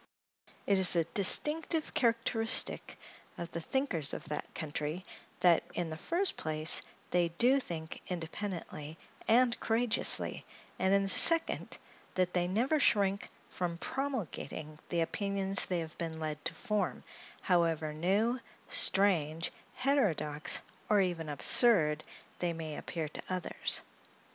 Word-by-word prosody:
It 200 -1 +2
is 185 -1 +8
a 170 - +2
distinctive 300 - +4
characteristic 230 -4 0 0.4
of 170 0 -7
the 170 - -5
thinkers 180 - 0
of - - -8
that 150 - -6
country, 155 +3 -5 0.4
that, 175 -2 +4
in 170 -2 -3
the - - -5
first 360 - +1
place, 155 0 +2 0.3
they 175 -1 +1
do 245 +11 +2
think 160 -9 -7
independently 170 -3 -7 0.3
and 240 +1 +2
courageously; 230 0 +1 0.4
and, 190 +1 +1
in 200 0 +3
the - - -3
second, 330 - +5 0.4
that 180 -1 -1
they 175 -1 0
never 245 - 0
shrink 200 -6 0 0.2
from 175 -2 -4
promulgating 170 - -6
the 170 -1 -1
opinions 195 +2 +1
they 180 -2 -2
have 160 -1 -9
been 160 -1 -5
led 155 -2 -5
to - - -4
form, 210 -4 -3 0.4
however 165 -4 0
new, 200 +10 0 0.3
strange, 170 -5 +2 0.2
heterodox, 180 - -1 0.3
or 210 -1 +3
even 175 -5 -2
absurd, 155 - +3 0.4
they 175 -1 -2
may 160 -2 -7
appear 160 0 -5
to 150 - -8
others. 185 -1 -2
180 Hz, 130 wpm, -31 LUFS, 160-225 Hz, 0.4 s, is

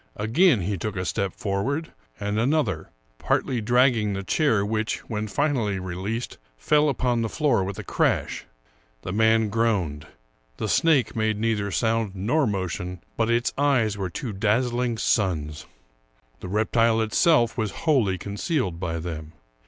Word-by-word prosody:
Again 120 - +3
he 95 +1 -2
took 105 +2 -3
a 90 -1 -2
step 95 +1 -1
for 100 -1 -2
ward, 145 +8 -2 0.3
and 105 +1 -1
another, 115 - 0 0.3
partly 125 -3 0
dragging 120 -2 +3
the 100 0 -4
chair, 110 -3 +2
which, 110 +1 -1
when 110 -1 -3
finally 120 -6 0
released, 95 +6 -4 0.2
fell 150 - +3
upon 125 -3 0
the 115 - -1
floor 145 -9 +1
with 95 +1 -5
a - - -5
crash. - - 0 0.6
The 90 - -4
man 110 0 +3
groaned; 100 -10 0 0.5
the - - -2
snake 150 -8 +2
made 110 -1 0
neither 105 -2 0
sound 110 -1 0
nor 125 +10 +1
motion, 90 -2 -3
but 115 0 0
its 120 +1 +1
eyes 125 -7 +2
were 95 -2 -3
two 110 +5 -5
dazzling 120 +3 0
suns. 80 -10 -1 0.7
The - - -7
reptile 110 +2 +2
itself 120 +3 +3
was 110 -3 -1 0.2
wholly 120 - +3
concealed 100 - -2
by 85 -2 -2
them. 80 -1 -6
110 Hz, 150 wpm, -25 LUFS, 95-120 Hz, 0.7 s, Again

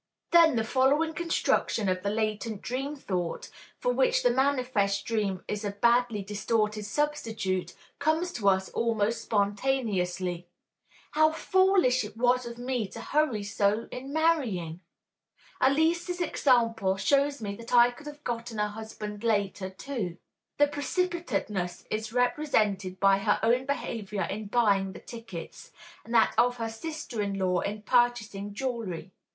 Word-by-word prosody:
Then 335 -4 +6
the 225 - +1
following 280 +7 +2
construction 330 - 0
of 185 0 0
the 200 - -1
latent 215 0 -2
dream 270 +4 -3
thought, 180 - -4 0.3
for - - 0
which - - +2
the - - +4
manifest 255 -8 +1
dream 205 -5 -1
is 210 +1 -3
a 205 - -1
badly 235 +1 +2
distorted 210 +1 -1
substitute, 220 -8 -2 0.2
comes 315 +4 +1
to 200 -4 +2
us 190 0 +1
almost 230 -1 0
spontaneously: 200 -5 -1 0.6
"How 310 +1 +4
foolish 370 -6 +3
it - - -9
was 250 +1 +2
of 235 0 -8
me 245 -3 -2
to - - -10
hurry 290 -8 0
so 205 +2 0
in 265 +2 -7
marrying! 250 - 0 0.8
Elise's 330 +6 +2
example 230 - +2
shows 280 +7 +2
me 200 -2 -4
that 230 0 -10
I 240 0 +6
could 290 +5 -13
have 295 0 -10
gotten 230 -1 -4
a 210 0 0
husband 210 0 -7
later 200 -4 0
too." 190 -3 -5 0.4
(The 290 - +6
precipitateness 290 - -2
is 215 0 -2
represented 215 -7 +1
by 195 0 +4
her 205 +1 +1
own 245 +4 +2
behavior 210 -8 -3
in 210 +4 -4
buying 200 -4 +2
the - - -9
tickets, 225 -8 -9 0.3
and 230 - -12
that 225 - +5
of 245 0 +3
her 230 -1 -3
sister 260 0 -5
in 200 -1 -2
law 180 -2 +1
in 210 +3 -4
purchasing 210 -4 +1
jewelry. 220 -8 -4
230 Hz, 145 wpm, -28 LUFS, 200-270 Hz, 0.8 s, Then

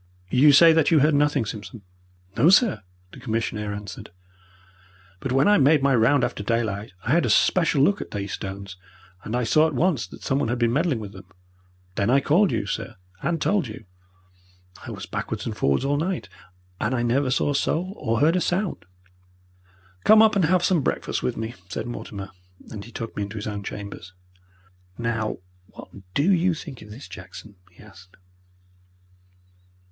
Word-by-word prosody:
You 145 +4 +6
say 165 +3 +7
that 160 -2 +3
you 160 -4 +4
heard 150 +2 +4
nothing, 145 -3 +2
Simpson?" 105 +1 -8 0.5
"No, 150 +9 +5
sir," 195 - +4 0.3
the - - -12
commissionaire 110 -2 -3
answered. 100 -3 -8 1.1
"But 135 - -4
when 135 +5 +3
I 205 -3 +5
made 145 +1 +4
my 140 -1 +3
round 125 +4 +3
after 120 -3 -2
daylight 110 -1 -2
I 120 - -1
had 170 +3 +4
a - - 0
special 165 -6 +3
look 200 +7 +2
at - - -7
these 100 -1 -5
stones, 95 -1 -7 0.5
and 110 - -4
I 125 - 0
saw 155 +7 +4
at 155 - -4
once 150 - +1
that - - -13
someone 135 -1 0
had 120 +2 -1
been 120 -1 +1
meddling 150 -1 +1
with 105 -3 -7
them. 95 -2 -12 0.7
Then 100 +3 0
I 135 +3 +5
called 175 +8 +3
you, - - -1
sir, - - -4 0.3
and 170 -1 -1
told 195 -3 +1
you. 110 0 -10 1.0
I - - -8
was - - -7
backwards - - -5
and - - -4
forwards 70 - +1
all 145 +1 +1
night, 170 - -2 0.5
and 115 +4 0
I 120 - 0
never 130 +3 +1
saw 135 +2 +1
a - - -2
soul 180 +6 -1
or 115 +1 -1
heard 160 +4 +4
a 180 - +1
sound." 180 - -2 1.2
"Come 220 +1 +7
up 215 -1 +4
and 190 -4 +3
have 180 +2 +2
some 180 -5 +2
breakfast - - -2
with 65 - -2
me," 110 +1 -4 0.2
said - - -4
Mortimer, 100 -5 -7 0.4
and 105 -2 -7
he 120 - -13
took 115 0 -6
me - - -3
into 100 +2 -5
his 105 - -5
own 105 -1 -4
chambers. 100 -3 -8 0.8
"Now, 115 -2 -2 0.3
what - - -13 0.3
DO 165 +8 +3
you 180 -1 +2
think 150 -5 -9
of 105 - -13
this, 115 +7 -10
Jackson?" 95 +2 -11
he 90 - -17
asked. 95 -3 -17
125 Hz, 185 wpm, -24 LUFS, 105-160 Hz, 1.2 s, say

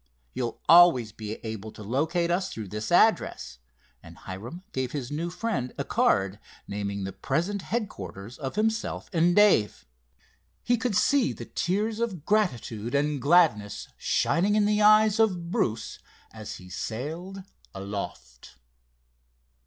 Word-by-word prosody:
You'll 120 -3 -3
always 165 -10 +7
be 110 0 -6
able 110 -1 -6
to 105 - -10
locate 160 - 0
us 185 +2 0
through 110 -4 -7
this 105 +2 -5
address," 60 0 +2 0.4
and - - -14
Hiram 115 - -8
gave 130 -1 -3
his 135 -4 -4
new 165 +4 -2
friend 180 - -3
a - - -1
card, 95 +1 +1 0.3
naming 100 -1 -4
the 95 0 -5
present 195 +4 -2
headquarters 115 - -5
of 135 -3 -5
himself 220 +1 -1
and 175 +1 +3
Dave. 205 - +4 0.8
He 245 - +2
could 230 -2 -2
see 280 -4 +3
the - - -8
tears 210 +5 -1
of 195 -10 -3
gratitude 120 - 0
and 145 -1 0
gladness 140 -10 +2
shining 195 +5 +1
in 210 -1 +3
the 210 0 +2
eyes 215 0 +5
of 180 -6 +1
Bruce 110 -8 -2 0.3
as 110 -2 -7
he 90 - -12
sailed 155 - -5 0.3
aloft. 95 -11 -7
150 Hz, 135 wpm, -27 LUFS, -, 0.8 s, always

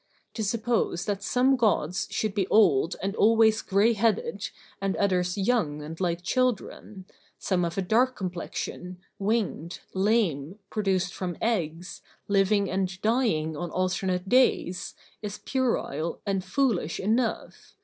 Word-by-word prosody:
To 220 - -3
suppose 225 -4 0
that 205 -2 -2
some 255 +6 +3
gods 195 -8 +1
should 215 -2 -1
be 195 -3 0
old 165 -8 +4
and 195 +1 -1
always 220 0 +4
gray 205 +4 +3
headed 230 - 0 0.3
and 195 -1 0
others 180 -2 +1
young 190 -9 0
and 160 +2 -8
like 175 -1 -1
children, 215 -4 -2 0.3
some 185 -2 0
of 170 +1 -3
a 195 - +1
dark 245 +7 +2
complexion, 180 0 -5 0.2
winged, 200 -5 -1
lame, 190 -5 +1
produced 190 -4 0
from 180 -3 -4
eggs, 180 -6 -2 0.3
living 200 0 +3
and 190 0 -2
dying 215 -10 +1
on 175 +3 -4
alternate 185 +1 -1
days, 200 -6 +2 0.3
is 210 -1 -5
puerile 240 - -1
and 195 -2 -1
foolish 195 - 0
enough. 225 +4 -2
195 Hz, 130 wpm, -27 LUFS, 180-225 Hz, 0.3 s, old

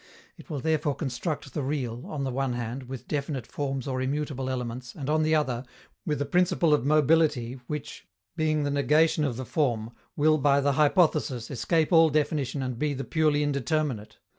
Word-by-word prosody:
It - - -15
will 150 -3 -3
therefore 155 -1 0
construct 140 0 -4
the 150 - -2
real, 130 -4 -3
on 145 -3 -4
the 135 - -2
one 135 0 -1
hand, 120 +2 -5
with 130 -2 -7
definite 140 -4 -3
Forms 135 -2 -3
or 130 -1 -2
immutable 135 -1 -2
elements, 125 -1 -4
and, 145 -1 -3
on 155 0 +3
the 155 0 +3
other, 130 -5 0 0.4
with 150 -2 0
a 145 - 0
principle 175 +1 +2
of 150 - +2
mobility 150 -4 +2
which, 150 -1 -6 0.3
being 155 -1 +1
the 145 - -1
negation 150 +2 +3
of 130 -6 -1
the 130 - -5
form, 120 -6 -1 0.2
will, 155 +1 +3
by 140 0 +4
the 140 0 +2
hypothesis, 150 - +2
escape 155 +7 +1
all 165 -1 +7
definition 145 -2 0
and 125 -2 -4
be 150 -1 0
the 135 - -4
purely 150 -1 +1
indeterminate. 140 -5 -1
145 Hz, 185 wpm, -27 LUFS, 130-155 Hz, 0.4 s, all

